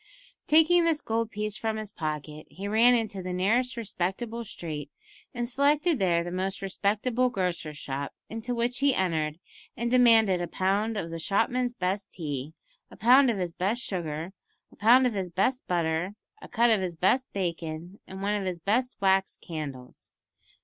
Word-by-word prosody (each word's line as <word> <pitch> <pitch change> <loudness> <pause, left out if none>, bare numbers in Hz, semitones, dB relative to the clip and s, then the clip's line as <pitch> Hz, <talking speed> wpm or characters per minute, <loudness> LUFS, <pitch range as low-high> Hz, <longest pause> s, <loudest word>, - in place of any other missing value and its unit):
Taking 325 +3 +5
this 325 -2 +2
gold 225 -2 -1
piece 210 -1 -3
from 220 -1 -2
his 215 -1 -5
pocket, 155 -2 -5
he 195 +2 -7
ran 230 +4 +5
into 215 -4 -2
the 180 0 -4
nearest 235 +8 +1
respectable 225 +2 -3
street, 155 -8 -6 0.4
and 240 -1 -3
selected 285 +4 +2
there 170 -3 +2
the 175 - -5
most 190 +2 -3
respectable 215 +6 0
grocer's 175 -7 -3
shop, 140 -1 -4 0.2
into 225 +2 -4
which 240 +1 0
he 280 -1 +3
entered, 160 -4 0 0.4
and 235 +1 -1
demanded 225 -7 +5
a 175 - -2
pound 200 +6 0
of 165 -4 -4
the 165 - -5
shopman's 240 +7 0
best 190 0 -2
tea, 150 -2 -5 0.3
a - - -14
pound 255 +4 +6
of 225 - 0
his 180 -3 -3
best 205 +8 -1
sugar, 165 -1 -4 0.4
a - - -18
pound 245 +5 +5
of 245 - +1
his 190 -3 -3
best 250 +9 0
butter, 170 +2 0 0.3
a - - -10
cut 235 +1 +3
of 215 -3 +3
his 180 -2 -3
best 250 +10 +2
bacon, 170 0 -4
and 190 +1 -8
one 205 +1 +1
of 200 -2 -1
his 180 -2 -3
best 245 +8 0
wax 190 0 +2
candles. 140 -6 -8
200 Hz, 175 wpm, -27 LUFS, 175-235 Hz, 0.4 s, pound